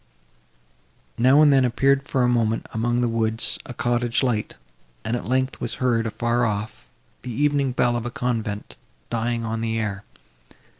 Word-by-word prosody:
Now 130 Hz, +5 st, +6 dB
and 145 Hz, -2 st, +6 dB
then, 135 Hz, -1 st, +5 dB
appeared 135 Hz, +3 st, +2 dB
for 135 Hz, -2 st, -1 dB
a -, -, +3 dB
moment, 115 Hz, -2 st, +1 dB
among 120 Hz, +2 st, 0 dB
the 120 Hz, -, +2 dB
woods, 115 Hz, -1 st, 0 dB
a 125 Hz, -, -7 dB
cottage 120 Hz, +1 st, 0 dB
light; 115 Hz, -5 st, -1 dB, 0.5 s
and, 115 Hz, -, 0 dB
at 120 Hz, -, -5 dB
length, 130 Hz, +1 st, 0 dB
was -, -, -3 dB
heard, 115 Hz, -3 st, +1 dB
afar 120 Hz, +2 st, 0 dB
off, 105 Hz, -, -3 dB, 0.3 s
the -, -, -7 dB
evening 140 Hz, +1 st, +1 dB
bell 120 Hz, -1 st, +1 dB
of 120 Hz, 0 st, -2 dB
a -, -, -2 dB
convent, 120 Hz, -5 st, -3 dB, 0.3 s
dying 115 Hz, 0 st, -1 dB
on 115 Hz, 0 st, -3 dB
the 115 Hz, 0 st, -1 dB
air. 105 Hz, -3 st, -3 dB
120 Hz, 165 wpm, -23 LUFS, 115-125 Hz, 0.5 s, Now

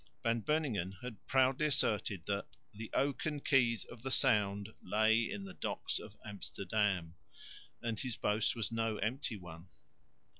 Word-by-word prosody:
Van 115 Hz, 0 st, +2 dB
Beuningen 115 Hz, -, 0 dB
had 120 Hz, -6 st, -7 dB
proudly 130 Hz, +3 st, +4 dB
asserted 105 Hz, -, +1 dB
that 100 Hz, 0 st, -1 dB, 0.3 s
"the 110 Hz, +1 st, -7 dB
oaken 145 Hz, +2 st, +1 dB
keys 125 Hz, -5 st, +3 dB
of 120 Hz, -, -12 dB
the 135 Hz, -, -3 dB
Sound 105 Hz, -6 st, +3 dB
lay 110 Hz, +4 st, +3 dB
in 100 Hz, -1 st, -4 dB
the 95 Hz, -, -8 dB
docks -, -, -2 dB
of 105 Hz, -1 st, -10 dB
Amsterdam," 100 Hz, -3 st, -1 dB, 0.7 s
and 115 Hz, -2 st, -1 dB
his 125 Hz, -4 st, -2 dB
boast 105 Hz, +3 st, +1 dB
was 115 Hz, -2 st, +1 dB
no 115 Hz, -1 st, 0 dB
empty 115 Hz, 0 st, -2 dB
one. 90 Hz, -2 st, -10 dB
110 Hz, 145 wpm, -35 LUFS, 100-125 Hz, 0.7 s, proudly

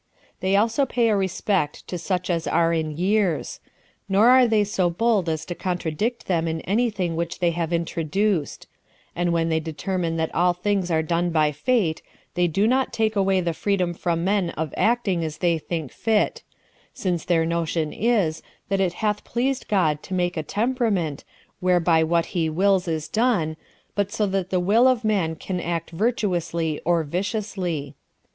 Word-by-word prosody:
They 190 Hz, +1 st, +1 dB
also 230 Hz, +7 st, +2 dB
pay 240 Hz, -2 st, +2 dB
a 215 Hz, -, +3 dB
respect 190 Hz, -4 st, -1 dB
to 180 Hz, -, -4 dB
such 180 Hz, +1 st, -1 dB
as 165 Hz, -2 st, -1 dB
are 170 Hz, 0 st, +2 dB
in 155 Hz, -2 st, -2 dB
years; 190 Hz, -1 st, 0 dB, 0.5 s
nor 205 Hz, +5 st, +5 dB
are 255 Hz, -1 st, +6 dB
they 220 Hz, -2 st, +3 dB
so 195 Hz, -3 st, 0 dB
bold 200 Hz, -1 st, +1 dB
as 160 Hz, -1 st, -2 dB
to 175 Hz, -, -4 dB
contradict 180 Hz, +6 st, -2 dB
them 170 Hz, -3 st, 0 dB
in 160 Hz, 0 st, -2 dB
any 235 Hz, +5 st, +1 dB
thing 180 Hz, -6 st, -2 dB
which 170 Hz, +1 st, -3 dB
they 175 Hz, -2 st, +2 dB
have 170 Hz, 0 st, -2 dB
introduced; 170 Hz, +1 st, -1 dB, 0.5 s
and 175 Hz, 0 st, 0 dB
when 165 Hz, -1 st, +1 dB
they 160 Hz, 0 st, +2 dB
determine 165 Hz, +2 st, -3 dB
that 160 Hz, 0 st, -2 dB
all 175 Hz, +1 st, +3 dB
things 185 Hz, 0 st, -1 dB
are 160 Hz, -1 st, +1 dB
done 170 Hz, +2 st, 0 dB
by 155 Hz, -2 st, +2 dB
fate, 170 Hz, -, 0 dB, 0.3 s
they 175 Hz, 0 st, +2 dB
do 195 Hz, +6 st, +1 dB
not 260 Hz, +3 st, +2 dB
take 220 Hz, -1 st, 0 dB
away 195 Hz, -1 st, +2 dB
the 170 Hz, -1 st, -1 dB
freedom 185 Hz, -1 st, 0 dB
from 170 Hz, -1 st, -1 dB
men 195 Hz, -2 st, +1 dB
of 155 Hz, -2 st, -3 dB
acting 215 Hz, -7 st, +1 dB
as 155 Hz, -1 st, -4 dB
they 170 Hz, 0 st, +1 dB
think 160 Hz, -4 st, -4 dB
fit; 220 Hz, -2 st, 0 dB, 0.5 s
since 175 Hz, -4 st, -1 dB
their 165 Hz, -2 st, +2 dB
notion 165 Hz, -1 st, -1 dB
is, 205 Hz, -8 st, +1 dB, 0.3 s
that 195 Hz, -1 st, +1 dB
it 180 Hz, -2 st, +1 dB
hath 210 Hz, -1 st, 0 dB
pleased 260 Hz, +3 st, -1 dB
God 155 Hz, -7 st, +1 dB
to 190 Hz, -, -5 dB
make 175 Hz, -1 st, 0 dB
a 160 Hz, -, -1 dB
temperament, 205 Hz, -, -1 dB, 0.4 s
whereby 175 Hz, -3 st, +3 dB
what 170 Hz, +1 st, +1 dB
he 165 Hz, -3 st, +1 dB
wills 190 Hz, +3 st, +2 dB
is 160 Hz, -2 st, -2 dB
done, 210 Hz, -9 st, +1 dB, 0.4 s
but 205 Hz, 0 st, -1 dB
so 220 Hz, -1 st, 0 dB
that 190 Hz, -2 st, -1 dB
the 185 Hz, -, +1 dB
will 215 Hz, +8 st, +4 dB
of 255 Hz, -3 st, +2 dB
man 190 Hz, -7 st, +1 dB
can 180 Hz, +3 st, -4 dB
act 170 Hz, -1 st, -3 dB
virtuously 170 Hz, -6 st, -1 dB
or 170 Hz, -1 st, +2 dB
viciously. 180 Hz, -, -3 dB
180 Hz, 180 wpm, -23 LUFS, 165-205 Hz, 0.5 s, are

